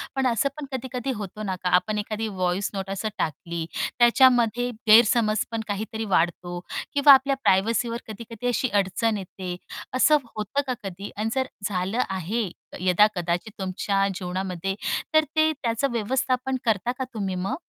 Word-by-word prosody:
पण 265 -1 +2
असं 245 +4 +1
पण 295 - -5
कधी-कधी 260 0 -3
होतो 210 +1 -6
ना, 190 -2 -2
का 180 - +1
आपण 210 +3 +1
एखादी 215 +1 -3
व्हॉइस 185 0 -1
नोट 195 -1 -4
असं 195 +3 -2
टाकली 165 +2 -3 0.3
त्याच्यामध्ये 245 -1 +5 0.2
गैरसमज 215 -1 +5
पण 225 -1 -2
काहीतरी 220 +2 -3
वाढतो 175 +1 0 0.3
किंवा 285 0 +8
आपल्या 270 +1 +4
प्रायव्हसीवर 230 +5 +2
कधी-कधी 230 +2 -6
अशी 245 0 +1
अडचण 205 +3 +1
येते, 185 -1 -6 0.4
असं 300 +4 +5 0.2
होतं 215 +7 -1
का 255 - 0
कधी? 195 +1 -6
आणि 220 +1 -1
जर 260 0 +1 0.2
झालं 195 +6 -1
आहे 190 +3 -2 0.3
यदा-कदाचित 180 0 +2
तुमच्या 195 +1 0
जीवनामध्ये 185 0 -3 0.4
तर 310 0 +6
ते 315 0 +4
त्याचं 255 0 -1
व्यवस्थापन 255 +3 0
करता 225 +2 +1
का - - 0
तुम्ही 195 -4 -2
मग? 195 +8 -2
215 Hz, 150 wpm, -25 LUFS, 190-245 Hz, 0.4 s, किंवा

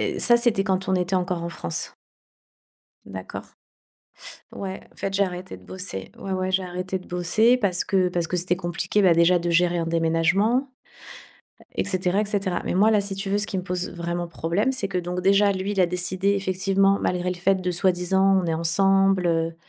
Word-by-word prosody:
Heu, - - -2
ça 240 - +6
c'était 235 -5 +2
quand 190 -1 -1
on 190 - +2
était 180 +1 0
encore 180 -1 -2
en 170 - -3
France. 85 - -4 1.1
D'accord. 95 -1 -7 1.1
Ouais 190 -1 -6
en - - -28
fait, 195 - -3
j'ai 200 0 +2
arrêté 180 0 -7
de - - -18
bosser, 180 - -6
ouais, 195 - -5
ouais, 185 0 -1
j'ai 190 0 +1
arrêté 180 +1 -4
de 185 - -16
bosser. 215 +8 +2
Parce 190 -7 0
que 185 -2 +1
parce 175 -1 -2
que 180 - -2
c'était 180 0 0
compliqué, 175 +3 -1
bah, 180 -3 +5
déjà 170 +2 +4
de 170 0 -2
gérer 175 +1 +2
un 165 - -2
déménagement 170 +10 +1 1.0
et - - -1
cetera 185 0 0
et 215 - 0
cetera. 200 -3 -2
Mais - - -2
moi 210 +4 +4
là, 210 - +3
si 200 -1 -3
tu 195 0 -2
veux, 205 - +1
ce 205 - -1
qui 185 +1 -3
me - - -3
pose 180 0 -3
vraiment 175 0 -4
problème, 170 +9 -1
c'est 235 -7 -2
que 190 -2 -2
donc 180 +1 -4
déjà, 200 +2 +4
lui, 190 +2 -3
il 195 - 0
a 180 - +5
décidé 180 +2 0
effectivement, 195 +1 +1
malgré 180 0 -1
le 180 - -4
fait 190 +2 +2
de 185 -1 -3
soi-disant, 190 +2 +2
«On - - -2
est 165 - 0
ensemble», 195 +3 +3
heu, 165 -1 0
185 Hz, 210 wpm, -24 LUFS, 175-195 Hz, 1.1 s, ça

